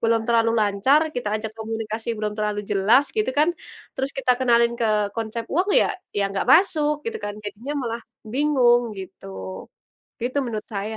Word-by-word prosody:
belum 225 -1 +2
terlalu 230 0 +3
lancar, 210 +8 +3
kita 245 -6 -3
ajak 220 0 -5
komunikasi 225 0 -4
belum 210 0 -2
terlalu 210 -1 -2
jelas, 210 +7 +4
gitu 430 - +1
kan, 305 +4 +4 0.4
terus 265 +1 -2
kita 260 -2 +3
kenalin 235 -2 +4
ke 210 -3 +1
konsep 225 +1 -4
uang 360 +6 +1
ya - - +1 0.2
ya 205 - +2
gak - - -1
masuk 310 -4 +4
gitu 460 0 -3
kan. 205 - -4
Jadinya 225 +7 -5
malah 230 0 -3 0.3
bingung 255 -4 +4
gitu. 190 0 -10 1.0
Itu 255 +3 -1
menurut 220 -4 -4
saya. 210 +2 -3
230 Hz, 165 wpm, -23 LUFS, 210-260 Hz, 1.0 s, jelas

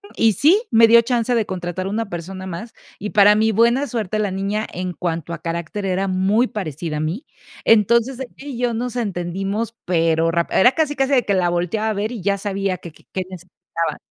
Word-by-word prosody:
Y 225 -1 +3
sí, 330 - +4
me 225 0 +7
dio 235 +1 +7
chance 240 0 0
de 225 - +1
contratar 185 0 -4
una 215 +1 -2
persona 185 +2 -6
más, 190 +6 -7 0.3
y 210 - -4
para 205 0 +6
mí 220 +1 +3
buena 235 +6 +3
suerte 215 -3 -2
la 210 -2 0
niña 200 +3 -2
en 180 0 -4
cuanto 170 -2 -3
a 170 - -7
carácter 170 +4 -4
era 190 +1 0
muy 195 +5 +2
parecida 160 - -4
a - - -2
mí, 165 - -3 0.4
entonces 235 +4 +3
ella 265 - -4
y 275 -3 -7
yo 245 -1 0
nos 245 +1 -3
entendimos, 195 +2 -3
pero 165 -1 +2
ráp 170 0 -1
era 245 +7 +5
casi 305 -2 0
casi 270 +1 +1
de 250 -3 +4
que 200 - +1
la 180 -2 +2
volteaba 180 +6 -1
a 220 - 0
ver 210 +3 -2
y 230 - -6
ya 200 +2 +1
sabía 195 -2 -2
qué 170 -1 -10
qué - - -23
qué 185 - -2
necesitaba. 180 -2 -5
200 Hz, 215 wpm, -20 LUFS, 180-230 Hz, 0.4 s, me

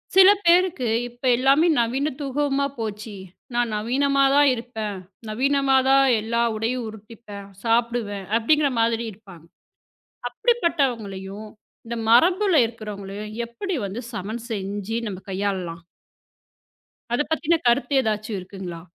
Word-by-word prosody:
சில 385 0 +9 0.2
பேருக்கு 340 -8 +3 0.2
இப்ப 240 +2 -24
எல்லாமே 275 +6 +4
நவீனத்துவமா 280 +2 0
போச்சி. 215 -1 -5 0.4
நான் 240 -2 0
நவீனமாதான் 275 +4 +3
இருப்பேன். 220 -4 -5 0.3
நவீனமாதான் 270 +2 +3 0.2
எல்லா 235 +2 -1 0.2
உடையும் 230 +2 -2
உடுத்திப்பேன், 215 -2 -11 0.2
சாப்பிடுவேன் 230 -4 0
அப்பிடிங்கிற 285 +5 +2
மாதிரி 230 0 +1
இருப்பாங்க. 190 -5 -15 0.9
அப்படிப்பட்டவங்களையும் 230 - -1 0.4
இந்த 235 +1 -4
மரபுல 355 - +4
இருக்கிறவங்களையும் 210 -2 -7
எப்பிடி 345 - -4
வந்து 200 +5 -5
சமன் 220 +3 -5
செஞ்சு 205 +1 -3
நம்ம 190 - -6
கையாளலாம்? 185 -4 -3 1.3
அதப் 295 +6 -1
பத்தின 325 +1 +2
கருத்து 240 +3 +2
ஏதாச்சு 215 -2 -2
இருக்குங்களா? 185 -2 -8
235 Hz, 100 wpm, -23 LUFS, 210-275 Hz, 1.3 s, சில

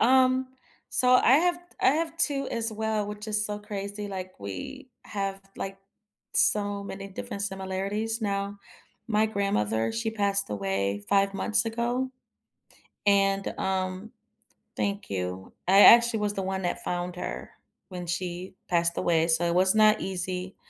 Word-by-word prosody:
Um, 260 +1 +4 0.4
so 250 0 +3
I 255 0 +6
have 350 0 +2 0.2
I - - +5
have 325 +2 -1
2 280 -5 0
as 230 -1 -2
well, 215 -1 -1
which 210 +1 -7
is 210 0 0
so 210 0 -3
crazy. 205 0 -5
Like, 185 -1 -5
we 100 - -7 0.2
have, 195 -1 -3 0.2
like, 195 0 -5 0.6
so 205 -1 +2
many 195 0 -7
different 200 +1 -6
similarities 200 +4 -2
now. 200 0 -2 0.5
My 215 0 +3
grandmother, 115 - 0
she 225 -1 -1
passed 200 -2 0
away 100 0 -1
5 195 0 +3
months 215 +3 +1
ago, 240 +3 -1 1.0
and, 195 -1 +3
um 190 +2 -2 0.6
Thank 200 0 -2
you. 90 0 -4 0.2
I 195 +2 +7
actually 235 0 +8
was 205 -1 0
the 195 - -1
one 190 0 -2
that 175 - -2
found 175 0 -3
her - - -5 0.4
when 180 -1 -6
she 175 +1 -4 0.2
passed 170 -1 +1
away, 165 -1 +2
so 165 +1 +2
it 170 - +1
was 185 +3 +4
not 215 0 +6
easy. 185 0 -4
200 Hz, 150 wpm, -27 LUFS, 185-220 Hz, 1.0 s, actually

